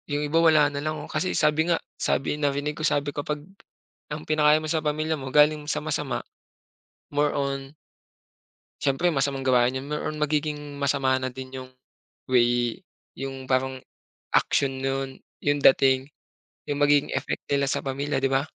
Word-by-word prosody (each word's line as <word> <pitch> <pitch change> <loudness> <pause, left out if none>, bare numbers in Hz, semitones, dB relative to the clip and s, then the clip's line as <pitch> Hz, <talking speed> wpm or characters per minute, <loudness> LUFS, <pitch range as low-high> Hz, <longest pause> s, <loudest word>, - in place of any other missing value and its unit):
Yung 145 0 -1
iba 160 +3 +2
wala 155 -3 +6
na 140 - -3
lang 155 +1 -2
oh. 150 - -7
Kasi 165 +4 -1
sabi 155 +2 +2
nga, 170 - +3 0.2
sabi 135 - 0
narinig 145 +1 0
ko - - -6
sabi, 145 -2 0
kapag 150 0 -4 0.6
ang 150 +1 -6
pinakain 155 0 +4
mo 155 - -4
sa 160 0 +1
pamilya 155 +1 -1
mo 130 -1 -6
galing 150 +1 +4
sa 150 0 -1
masama, 150 -4 -2 0.9
more 145 +1 +1
on 140 0 -3 1.1
Siyempre, 155 +6 +1
masamang 135 -1 -1
gawain 125 0 +3
yun, 130 - -6
more 150 - -2
on 155 - -6
magiging 150 0 0 0.2
masama 140 -1 +2
na 130 - -1
din 130 +1 -9
yung 130 -1 -7 0.6
way 120 -1 +2 0.3
yung 135 0 -6
parang 130 0 0 0.6
action 135 -1 +2
nun, 135 0 -3 0.2
yung 145 0 +1
dating, 135 0 +4 0.6
yung 145 0 -3
magiging 145 0 +3
effect - - -3
nila 140 -1 +1
sa - - -2
pamilya, 140 +1 -2
di - - +1
ba? 135 0 +3
145 Hz, 165 wpm, -25 LUFS, 135-150 Hz, 1.1 s, wala